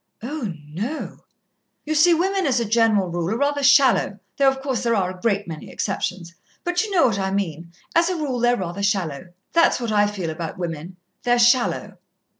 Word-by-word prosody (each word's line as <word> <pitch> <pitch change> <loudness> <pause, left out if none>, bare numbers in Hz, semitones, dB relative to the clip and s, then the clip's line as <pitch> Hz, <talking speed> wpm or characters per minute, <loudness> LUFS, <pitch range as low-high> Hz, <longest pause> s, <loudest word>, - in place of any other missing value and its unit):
"Oh, 255 -5 -4 0.2
no." 220 - -5 0.7
"You 310 - -1
see, 330 +3 +5
women, 380 +2 0
as 255 -3 +2
a 235 - -1
general 220 -4 +2
rule, 170 0 -2
are 220 - -1
rather 285 +2 0
shallow, 275 -7 +4 0.2
though, 275 -1 +5
of 265 0 -3
course, 265 -3 -2
there 235 -1 +1
are 185 -3 0
a 180 - -17
great 205 -4 0
many 160 -2 -8
exceptions. 185 -3 -3 0.3
But 355 +3 0
you 435 - -5
know 370 -4 +3
what 210 -6 +1
I 190 0 -1
mean 170 -4 -3 0.2
as 335 +1 +3
a 365 - -1
rule 285 -6 -2
they're 240 +1 +3
rather 185 0 -4
shallow. 185 -6 -1 0.3
That's 335 -5 +4
what 235 -2 -3
I 205 -1 +3
feel 190 -6 -4
about 160 0 -6
women, 170 0 -5 0.2
they're 245 0 +2
shallow." 240 +1 +2
225 Hz, 200 wpm, -22 LUFS, 185-280 Hz, 0.7 s, see